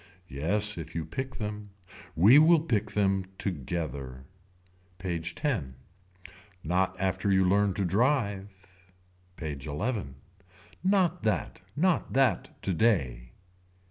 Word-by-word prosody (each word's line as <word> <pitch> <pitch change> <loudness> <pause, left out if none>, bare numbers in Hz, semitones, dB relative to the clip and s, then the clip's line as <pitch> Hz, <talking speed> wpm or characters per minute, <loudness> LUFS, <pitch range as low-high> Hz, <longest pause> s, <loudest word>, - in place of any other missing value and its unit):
Yes 100 +8 -1
if 80 -1 -8
you 80 -2 -2
pick 130 -1 -5
them. 105 -1 -5 0.5
We 110 - +7
will 160 +1 +6
pick 110 -9 0
them 95 -2 +1
together. 70 -6 -4 0.7
PAGE 85 -3 -3
X. 125 - +1 1.0
Not 95 +3 0
after 95 +1 0
you 95 -1 +4
learn 100 0 +2
to 100 - 0
drive. 100 - +1 0.8
PAGE 75 -5 -6
XI. 100 - -2 0.8
Not 185 -3 +2
that. 110 -3 -1
Not 180 +3 +1
that 135 -3 +1
today. 75 - 0
95 Hz, 110 wpm, -28 LUFS, 85-115 Hz, 1.0 s, We